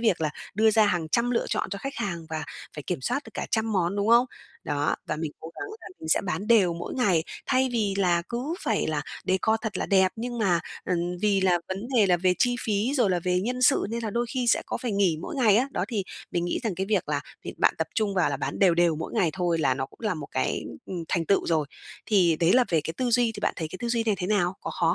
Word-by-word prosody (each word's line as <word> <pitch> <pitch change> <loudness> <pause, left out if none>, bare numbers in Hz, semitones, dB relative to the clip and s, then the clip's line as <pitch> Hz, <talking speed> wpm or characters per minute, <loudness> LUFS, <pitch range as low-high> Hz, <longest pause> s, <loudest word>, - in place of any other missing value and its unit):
việc 220 -8 +2
là 155 -2 0 0.2
đưa 220 +1 +4
ra 215 -1 +4
hàng 175 -5 0
trăm 235 +8 +1
lựa 235 - 0
chọn - - -2
cho 200 - -4
khách 275 +5 -5
hàng 175 -7 -3
và 160 -1 -3 0.3
phải 150 - -6
kiểm 175 0 -3
soát 280 - -1
được - - -12
cả - - -3
trăm 220 -1 0
món, 185 0 +1
đúng 205 +1 0
không? 235 +2 +6 0.4
Đó, 145 -1 0
và 155 - -2
mình 155 -1 -3
cố 160 - -8
gắng 400 - -6
là - - -10
mình 160 - -7
sẽ - - +4
bán 185 +1 -3
đều 200 -7 +4
mỗi 170 - -6
ngày, 185 -11 +2 0.2
thay 260 0 +2
vì 210 -4 0
là 175 -3 +2
cứ 255 +8 -3
phải - - 0
là - - -1 0.2
decor 190 +4 +2
thật 220 -2 -3
là - - -2
đẹp 190 -2 +4
nhưng 240 +1 -4
mà, 180 -6 +2 0.2
ừm, 180 0 -1
vì 200 -2 +3
là 180 -2 +3
vấn 190 +1 -3 0.2
đề 210 -4 +5
là 180 -1 +4
về 180 +1 +2
chi 245 -1 +2
phí 215 +5 +1
rồi 240 -8 +3
là 180 - +2
về 180 0 +2
nhân 250 +4 -2
sự, 270 -3 +4
nên 235 +1 -3
là 215 - -2
đôi 240 +3 -1
khi 250 -2 0
sẽ - - +3
có - - -2
phải 240 -4 -3
nghỉ 190 -5 +2
mỗi - - -5
ngày 220 -6 +5
á. 260 +4 +2
Đó, - - -1
thì 210 -6 -2 0.3
mình 175 -1 -1
nghĩ 175 - -1
rằng 215 -6 -1
cái 190 +2 -2
việc 215 - +1
là - - 0 0.2
việc - - -6
bạn - - +4
tập - - 0
trung 210 -3 0
vào 180 -5 +2
là 140 - -1
bán 135 +1 -4
đều 185 -4 +5
đều 170 -2 +3
mỗi 160 - -5
ngày 185 -8 +2
thôi 175 -1 0
là 135 -5 +2
nó 135 0 -3
cũng - - -23
là 215 -4 0
một 155 -3 -7
cái, - - -1 0.2
ừm, 175 -3 -5
thành 170 -2 0
tựu 200 - +2
rồi. 155 -3 +1 0.4
Thì 180 -7 +4
đấy 170 +2 +4
là 255 0 +5
về 165 -3 +2
cái 160 - -3
tư 250 -2 0
duy, 235 -1 +3
thì - - -7
bạn - - +1
thấy 160 -2 -3
cái 185 - -8
tư 235 - -1
duy 235 -1 +1
này 215 - +2
thế 180 - -2
nào? 190 -3 +1
Có - - -5
khó 165 -1 +1
195 Hz, 285 wpm, -26 LUFS, 170-225 Hz, 0.4 s, không